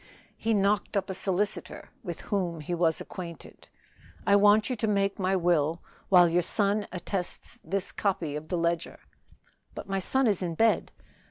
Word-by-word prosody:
He 225 Hz, -1 st, 0 dB
knocked 200 Hz, 0 st, +1 dB
up 190 Hz, -1 st, -1 dB
a -, -, -2 dB
solicitor, 195 Hz, +2 st, -2 dB
with 175 Hz, -5 st, -6 dB
whom 175 Hz, -5 st, -2 dB
he 165 Hz, +4 st, -4 dB
was 165 Hz, -2 st, +1 dB
acquainted. 170 Hz, -3 st, -9 dB, 0.6 s
"I 200 Hz, -, +5 dB
want 205 Hz, +1 st, +5 dB
you 255 Hz, -, -1 dB
to 220 Hz, -, -1 dB
make 200 Hz, -1 st, +1 dB
my 190 Hz, 0 st, +1 dB
will, 170 Hz, -2 st, +1 dB, 0.3 s
while 180 Hz, -2 st, +7 dB
your 170 Hz, +1 st, +2 dB
son 205 Hz, +3 st, +1 dB
attests 180 Hz, 0 st, -4 dB
this 195 Hz, 0 st, -2 dB
copy 180 Hz, -7 st, -1 dB
of 150 Hz, +1 st, -6 dB
this 180 Hz, -, 0 dB
ledger." 170 Hz, 0 st, -1 dB, 0.8 s
"But -, -, -7 dB
my 195 Hz, 0 st, -1 dB
son 265 Hz, +8 st, +1 dB
is 205 Hz, -5 st, +2 dB
in 170 Hz, -2 st, -2 dB
bed." 225 Hz, +5 st, +2 dB
190 Hz, 170 wpm, -28 LUFS, 170-205 Hz, 0.8 s, while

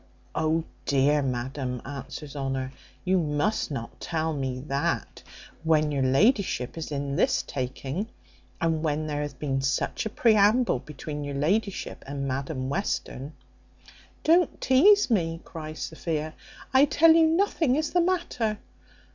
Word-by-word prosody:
O 160 Hz, +1 st, +1 dB, 0.2 s
dear 145 Hz, +2 st, +3 dB
Madam!" 130 Hz, 0 st, -3 dB
answers 140 Hz, +2 st, -7 dB
Honour, 135 Hz, -1 st, -3 dB, 0.3 s
"you 185 Hz, 0 st, +3 dB
must 160 Hz, +7 st, 0 dB
not 115 Hz, -6 st, -6 dB
tell 160 Hz, -1 st, -1 dB
me 130 Hz, -3 st, -3 dB
that, 140 Hz, 0 st, -2 dB, 0.4 s
when 155 Hz, -2 st, +3 dB
your 140 Hz, -2 st, 0 dB
ladyship 135 Hz, -, +2 dB
is 160 Hz, -2 st, -6 dB
in 140 Hz, -1 st, -2 dB
this -, -, +2 dB
taking, 135 Hz, -, -4 dB, 0.5 s
and 160 Hz, -1 st, +1 dB
when 155 Hz, -1 st, -1 dB
there 150 Hz, -1 st, -2 dB
hath 145 Hz, -3 st, -5 dB
been 135 Hz, -2 st, -1 dB
such 135 Hz, +9 st, -1 dB
a -, -, -4 dB
preamble 215 Hz, -, +4 dB
between 150 Hz, +1 st, -7 dB
your 145 Hz, -1 st, -4 dB
ladyship 195 Hz, +8 st, -1 dB
and 140 Hz, 0 st, -3 dB
Madam 135 Hz, 0 st, -3 dB
Western." 145 Hz, -3 st, -3 dB, 0.9 s
"Don't 340 Hz, +1 st, +3 dB
teaze 355 Hz, +6 st, +5 dB
me," 165 Hz, -6 st, +1 dB
cries 155 Hz, -2 st, -8 dB
Sophia; 155 Hz, -1 st, -3 dB, 0.4 s
"I 265 Hz, +2 st, +7 dB
tell 320 Hz, +3 st, +6 dB
you 325 Hz, 0 st, +6 dB
nothing 325 Hz, -5 st, +2 dB
is 310 Hz, +1 st, -1 dB
the 355 Hz, -, +4 dB
matter. 335 Hz, -, 0 dB
155 Hz, 140 wpm, -27 LUFS, 140-215 Hz, 0.9 s, I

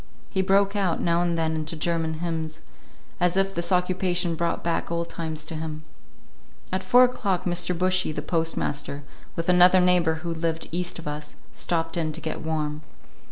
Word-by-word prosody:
He 190 Hz, -, +1 dB
broke 195 Hz, +1 st, +3 dB
out 190 Hz, -5 st, +1 dB
now 170 Hz, 0 st, +2 dB
and 170 Hz, -1 st, 0 dB
then 160 Hz, -1 st, +1 dB
into 155 Hz, +1 st, -3 dB
German 165 Hz, 0 st, -1 dB
hymns, 160 Hz, -1 st, -4 dB, 0.6 s
as 180 Hz, +1 st, +2 dB
if 195 Hz, 0 st, +2 dB
this 170 Hz, -1 st, -3 dB
occupation 180 Hz, -1 st, +1 dB
brought 170 Hz, +1 st, -1 dB
back 170 Hz, -1 st, -1 dB
old 170 Hz, 0 st, -2 dB
times 160 Hz, -2 st, -4 dB
to -, -, -6 dB
him. 155 Hz, -1 st, -5 dB, 0.9 s
At 185 Hz, 0 st, -1 dB
four 245 Hz, +7 st, +6 dB
o'clock 205 Hz, -7 st, +1 dB
Mr. 175 Hz, 0 st, +1 dB
Bushy, 185 Hz, -1 st, +2 dB
the -, -, -4 dB
postmaster, 150 Hz, -3 st, -1 dB, 0.3 s
with 165 Hz, -, -3 dB
another 180 Hz, +1 st, +7 dB
neighbor 180 Hz, -3 st, +3 dB
who 170 Hz, -, -1 dB
lived 165 Hz, 0 st, -2 dB
east 175 Hz, +1 st, -1 dB
of 165 Hz, -, -8 dB
us, 150 Hz, 0 st, -6 dB, 0.2 s
stopped 165 Hz, -1 st, -1 dB
in 160 Hz, -2 st, 0 dB
to 165 Hz, -, -3 dB
get 160 Hz, -, -4 dB
warm. 155 Hz, -1 st, -2 dB
170 Hz, 175 wpm, -25 LUFS, 160-180 Hz, 0.9 s, another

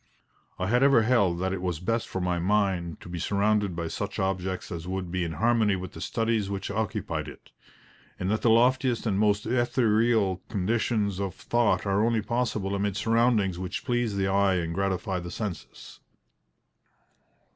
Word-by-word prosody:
I 90 Hz, -, -2 dB
had 120 Hz, +6 st, +2 dB
ever 135 Hz, -4 st, +5 dB
held 110 Hz, -7 st, +2 dB
that 95 Hz, 0 st, 0 dB
it 95 Hz, -, -4 dB
was 90 Hz, -4 st, -2 dB
best 115 Hz, +6 st, -1 dB
for 95 Hz, -, -4 dB
my 90 Hz, -1 st, 0 dB
mind 95 Hz, -3 st, 0 dB
to -, -, -11 dB
be 85 Hz, -1 st, -5 dB
surrounded 100 Hz, +1 st, +1 dB
by 85 Hz, 0 st, -3 dB
such -, -, -4 dB
objects 95 Hz, -1 st, -2 dB
as 85 Hz, 0 st, -5 dB
would 95 Hz, -2 st, -4 dB
be 90 Hz, 0 st, -1 dB
in 85 Hz, -1 st, -3 dB
harmony 110 Hz, +3 st, +2 dB
with 95 Hz, 0 st, -6 dB
the -, -, -10 dB
studies 115 Hz, -3 st, 0 dB
which 100 Hz, 0 st, -4 dB
occupied 100 Hz, -7 st, -2 dB
it, 75 Hz, -, -12 dB, 0.7 s
and 90 Hz, -, -2 dB
that 110 Hz, -, 0 dB
the 120 Hz, -, +3 dB
loftiest 125 Hz, +2 st, +3 dB
and 100 Hz, -3 st, 0 dB
most 105 Hz, -1 st, +2 dB
ethereal 115 Hz, -4 st, +2 dB
conditions 105 Hz, 0 st, 0 dB
of 100 Hz, -3 st, -3 dB
thought 120 Hz, -2 st, +1 dB
are 100 Hz, +1 st, +2 dB
only 115 Hz, -2 st, +1 dB
possible 110 Hz, -4 st, -1 dB
amid 100 Hz, 0 st, -1 dB
surroundings 110 Hz, -4 st, +2 dB
which 90 Hz, 0 st, -5 dB
please 120 Hz, -4 st, 0 dB
the 95 Hz, -1 st, +1 dB
eye 95 Hz, 0 st, +3 dB
and 85 Hz, -2 st, -2 dB
gratify 95 Hz, 0 st, -1 dB
the 85 Hz, 0 st, -7 dB
senses. 95 Hz, -2 st, -7 dB
100 Hz, 175 wpm, -27 LUFS, 90-115 Hz, 0.7 s, ever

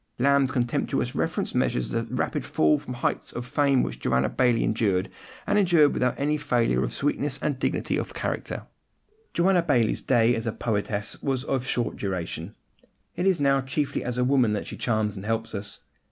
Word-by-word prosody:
Lamb's 140 Hz, +1 st, +3 dB
contemptuous 120 Hz, -2 st, -1 dB
reference -, -, -1 dB
measures 60 Hz, -, 0 dB
the -, -, -1 dB
rapid -, -, -1 dB
fall 75 Hz, -1 st, +2 dB
from 125 Hz, -, -7 dB
the -, -, -8 dB
heights -, -, -1 dB
of 120 Hz, -, -5 dB
fame 140 Hz, 0 st, +2 dB
which -, -, -4 dB
Joanna 65 Hz, +1 st, +1 dB
Baillie 120 Hz, -3 st, +2 dB
endured, 100 Hz, -4 st, +1 dB, 0.4 s
and 210 Hz, -, +2 dB
endured 170 Hz, -7 st, +4 dB
without 125 Hz, -1 st, +1 dB
any 150 Hz, +2 st, +1 dB
failure 125 Hz, -6 st, +1 dB
of -, -, -2 dB
sweetness 145 Hz, -1 st, -1 dB
and 145 Hz, -4 st, -2 dB
dignity -, -, 0 dB
of -, -, -4 dB
character. -, -, -3 dB, 0.7 s
Joanna 180 Hz, +1 st, +4 dB
Baillie's 130 Hz, -9 st, +1 dB
day 115 Hz, 0 st, +3 dB
as 115 Hz, 0 st, -3 dB
a -, -, +1 dB
poetess 105 Hz, -2 st, -2 dB
was 135 Hz, -2 st, -1 dB
of 130 Hz, -3 st, -2 dB
short 120 Hz, -1 st, -1 dB
duration: 90 Hz, -1 st, -4 dB, 0.6 s
it 180 Hz, -, 0 dB
is 190 Hz, -4 st, +3 dB
now 135 Hz, -1 st, +3 dB
chiefly 140 Hz, +2 st, -2 dB
as 125 Hz, -1 st, -3 dB
a 125 Hz, -, +2 dB
woman 125 Hz, -4 st, +3 dB
that 105 Hz, -, -2 dB
she -, -, -7 dB
charms 110 Hz, -3 st, 0 dB
and 95 Hz, -, -7 dB
helps 115 Hz, 0 st, -2 dB
us. 100 Hz, -1 st, -6 dB
125 Hz, 185 wpm, -26 LUFS, 110-140 Hz, 0.7 s, endured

